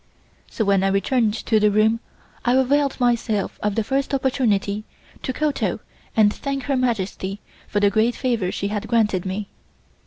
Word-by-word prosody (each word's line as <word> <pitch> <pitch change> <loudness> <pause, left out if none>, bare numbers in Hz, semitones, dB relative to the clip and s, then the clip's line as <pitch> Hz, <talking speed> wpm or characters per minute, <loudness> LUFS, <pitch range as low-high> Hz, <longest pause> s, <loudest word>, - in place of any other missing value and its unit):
So 220 - -2
when 195 -1 +3
I - - +3
returned 210 +3 +1
to 220 -1 +1
the 210 0 +4
room 215 +2 +3 0.4
I 245 +1 +3
availed 275 +2 +2
myself 235 -4 0
of 210 -1 0
the 225 - +1
first 275 +4 0
opportunity 215 -6 0 0.4
to - - -2
kowtow 300 +2 -1 0.4
and 210 -1 +5
thank 275 -1 -3
Her 275 +1 0
Majesty 205 -5 -1 0.3
for 205 - 0
the 205 -1 +3
great 225 +3 +2
favor 230 -8 0
she 200 - -2
had 210 -1 -3
granted 210 -6 +1
me. 195 +2 -3
220 Hz, 165 wpm, -22 LUFS, 205-255 Hz, 0.4 s, and